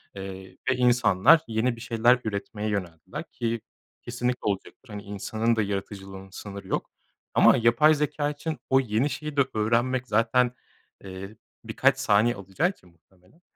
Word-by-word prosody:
eee, 95 -1 -8
ve 130 - +3
insanlar 125 - +5
yeni 115 +2 0
bir 115 - -12
şeyler 120 +1 +3
üretmeye 105 0 -4
yöneldiler 90 -6 -4
ki 115 -1 -2 0.4
kesinlikle 125 +1 -2
olacaktır. 105 +5 -4
Hani, 105 -1 -7
insanın 110 +3 -1
da 110 - +1
yaratıcılığının 95 -1 -5
sınırı 100 +1 -9
yok - - -2 0.4
ama - - +6
yapay 115 +7 +5
zekâ 150 0 -1
için 150 +1 -5
o 130 - +5
yeni 120 +2 0
şeyi 150 0 -6
de - - +6
öğrenmek 120 +4 +1
zaten, 120 +2 +2 0.5
eee, 95 +2 -8 0.3
birkaç 130 +4 +2
saniye 120 -2 +3
alacağı 100 - -1
için 90 - -12
muhtemelen. 90 - -28
115 Hz, 145 wpm, -26 LUFS, 100-125 Hz, 0.5 s, ama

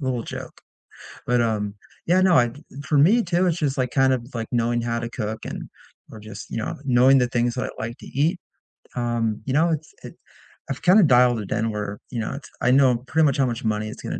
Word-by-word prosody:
Little 130 -4 -2
joke, - - -8 0.7
but, 125 0 +2
um, 105 -3 -1 0.3
yeah, 180 +2 +4
no, 185 -2 +5
I 120 -3 +3 0.3
for 150 - 0
me 205 +12 +5
too, 175 0 +1
it's 170 -1 0
just 145 -4 -1
kind 135 -1 +3
of 120 -2 -2
like 115 -1 -4
knowing 120 0 +1
how 115 0 -1
to 120 0 -5
cook 110 -2 -4
and - - -6 0.4
or 110 - -9
just, 105 0 -10
you - - -5
know, 110 - -4
knowing 130 +1 +5
the 125 -1 +2
things 120 0 0
that 125 - -2
I - - -4
like 115 +1 -5
to - - -13
eat, 160 +7 0 0.6
um, 120 -3 -1
you 135 - -1
know, 160 +4 +3
it's 155 -1 -3
it - - -9 0.6
I've 135 - -4
kind 185 +5 +6
of 185 - +5
dialed 125 -2 +4
it 100 - -8
in 115 +1 0
where, 105 -1 -4
you 120 - -3
know, 110 - -3
it's 140 -2 -9
I 125 - +3
know 130 -3 +4
pretty 160 -1 +3
much 140 -2 +1
how 135 - +3
much 120 +1 -4
money 110 -1 -1
it's 110 - -9
going - - -4
125 Hz, 235 wpm, -23 LUFS, 115-140 Hz, 0.7 s, kind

